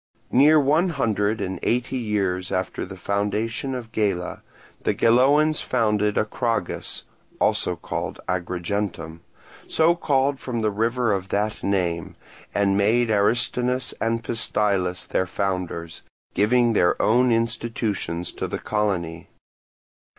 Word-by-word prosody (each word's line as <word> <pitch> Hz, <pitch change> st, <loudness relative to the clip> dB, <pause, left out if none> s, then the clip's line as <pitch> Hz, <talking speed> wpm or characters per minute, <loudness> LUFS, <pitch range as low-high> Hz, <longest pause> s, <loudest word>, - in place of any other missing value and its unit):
Near 150 Hz, +5 st, +6 dB
one 155 Hz, +6 st, +3 dB
hundred 110 Hz, -, 0 dB
and 95 Hz, -2 st, -3 dB
eight 125 Hz, +1 st, 0 dB
years 100 Hz, -7 st, -1 dB
after 95 Hz, 0 st, -2 dB
the 95 Hz, -, -8 dB
foundation 105 Hz, +7 st, -2 dB
of 115 Hz, -3 st, -7 dB
Gela, 95 Hz, -6 st, -1 dB, 0.4 s
the -, -, 0 dB
Geloans 145 Hz, +6 st, +4 dB
founded 105 Hz, -4 st, +1 dB
Acragas 115 Hz, +2 st, -2 dB, 0.4 s
(Agrigentum), 90 Hz, -2 st, -2 dB, 0.5 s
so 160 Hz, +2 st, +4 dB
called 140 Hz, -4 st, +1 dB
from 120 Hz, -3 st, -3 dB
the 110 Hz, -1 st, +1 dB
river 115 Hz, +2 st, +1 dB
of 95 Hz, -1 st, -2 dB
that 105 Hz, +2 st, -1 dB
name, 85 Hz, -4 st, -1 dB, 0.4 s
and 100 Hz, -1 st, +2 dB
made 110 Hz, +4 st, +3 dB
Aristonous 120 Hz, +4 st, +1 dB
and 115 Hz, 0 st, 0 dB
Pystilus 100 Hz, -6 st, -1 dB
their 95 Hz, -, 0 dB
founders; 90 Hz, -3 st, -3 dB, 0.3 s
giving 120 Hz, +3 st, +3 dB
their 90 Hz, -4 st, +2 dB
own 125 Hz, +3 st, +4 dB
institutions 115 Hz, -6 st, -1 dB
to -, -, -4 dB
the -, -, -3 dB
colony. 90 Hz, -6 st, -2 dB
105 Hz, 115 wpm, -24 LUFS, 95-120 Hz, 0.5 s, Near